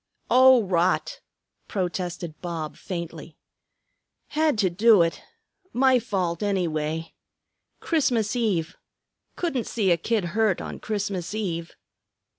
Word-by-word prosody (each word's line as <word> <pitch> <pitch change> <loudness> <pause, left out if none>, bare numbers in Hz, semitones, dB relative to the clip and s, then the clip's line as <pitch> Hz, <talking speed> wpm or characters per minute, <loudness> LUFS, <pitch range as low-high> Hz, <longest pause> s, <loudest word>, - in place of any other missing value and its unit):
"Oh, 260 -1 +7
rot!" 185 - 0 0.5
protested 175 -4 -4
Bob 165 -3 -4
faintly. 170 -3 -7 0.9
"Had 310 -4 +1
to 190 -4 +2
do 210 0 +5
it; 165 - -2 0.5
my 260 0 +4
fault 185 -7 -2
anyway; 165 -5 -1 0.7
Christmas 245 -9 +1
Eve, 190 -9 0 0.6
couldn't 295 -10 -2
see 200 -6 +1
a 170 - +4
kid 210 +3 0
hurt 215 -4 +2
on - - -6
Christmas 200 -3 -3
Eve." 170 -6 -3
195 Hz, 105 wpm, -25 LUFS, 170-230 Hz, 0.9 s, Oh